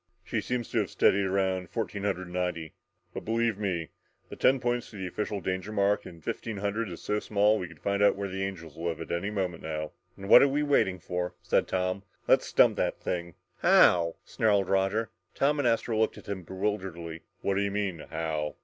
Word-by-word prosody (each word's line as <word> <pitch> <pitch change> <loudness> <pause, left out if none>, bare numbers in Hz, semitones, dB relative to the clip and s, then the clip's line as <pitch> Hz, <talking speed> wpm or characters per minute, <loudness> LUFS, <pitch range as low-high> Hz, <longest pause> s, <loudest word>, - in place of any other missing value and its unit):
"She 110 +2 -2
seems 125 0 -2
to - - +2
have - - -1
steadied 100 0 +3
around 95 -2 0
fourteen 105 -3 -3
hundred 90 -3 -1
ninety 90 -3 -2 0.4
and - - -5
believe 115 -1 0
me, 90 -6 -2 0.4
the - - -7
ten 135 +1 +4
points 120 -1 -1
to - - -13
the 95 -2 -4
official 105 +2 -3
danger 95 +3 -3
mark 100 -1 +1
of 85 -3 -12
fifteen 110 +5 -4
hundred 100 +2 -2
is 85 - -8
so 105 0 0
small 105 0 +3
that 110 - 0
we 90 - -4
could 85 -3 -15
find 100 0 0
out 105 - +5
where 100 0 -3
the 95 0 -3
angels 85 -6 -6
live 85 0 -3
any 85 +4 -1
moment 95 -5 -2
now!" 75 -1 -4 0.3
"Then 100 - -8
what're 125 +6 +9
we 145 +2 0
waiting 140 -10 +2
for," 90 0 -3
said - - +2
Tom. 95 +1 -1 0.3
"Let's - - +3
dump - - +5
that - - 0
thing!" 85 -1 -3 0.2
"How?" 85 -2 +5
snarled 100 -4 +1
Roger. 95 +3 +1 0.2
Tom 145 +2 +2
and 140 - +2
Astro 115 -1 +1
looked 110 - +1
at - - -12
him 100 -2 -3
bewilderedly. 95 -3 -4 0.2
"What 100 - +1
do 95 - +1
you 100 - +1
mean 100 -4 -2
'how'?" 80 -2 -2
95 Hz, 205 wpm, -29 LUFS, 90-105 Hz, 0.4 s, what're